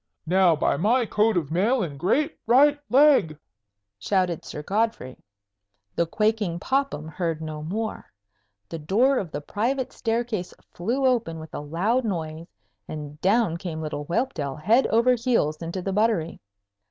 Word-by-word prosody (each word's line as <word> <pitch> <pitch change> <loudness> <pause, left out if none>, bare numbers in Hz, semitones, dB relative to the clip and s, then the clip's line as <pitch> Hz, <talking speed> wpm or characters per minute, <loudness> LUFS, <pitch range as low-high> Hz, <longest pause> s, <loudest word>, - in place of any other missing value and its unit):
"Now, 180 0 +4
by 150 - +1
my 235 - +2
coat 215 -1 +2
of 155 -4 -2
mail 215 +8 +2
and 145 -5 -6
great 275 - +1
right 285 +5 +5
leg!" 260 - +4 0.6
shouted 180 - 0
Sir 150 - -7
Godfrey. 210 - -1 0.8
The 170 - +1
quaking 210 -3 0
Popham 265 - -1
heard 165 0 -3
no 155 -1 -6
more. 210 +8 -4 0.6
The 165 - -6
door 240 - +2
of 180 - -5
the 150 - -5
private 245 - -2
staircase 225 -5 -2 0.2
flew 245 +10 -1
open 235 -10 +1
with 160 -1 -11
a - - -4
loud 180 - 0
noise, 165 -5 -4 0.4
and 150 -1 -8
down 200 -3 +2
came 170 -3 -5
little 150 -2 -4
Whelpdale 165 - -2
head 220 - +3
over 235 +3 +3
heels 230 -11 +1
into 170 +2 -4
the 195 - -2
buttery. 210 -6 0
190 Hz, 150 wpm, -25 LUFS, 160-235 Hz, 0.8 s, right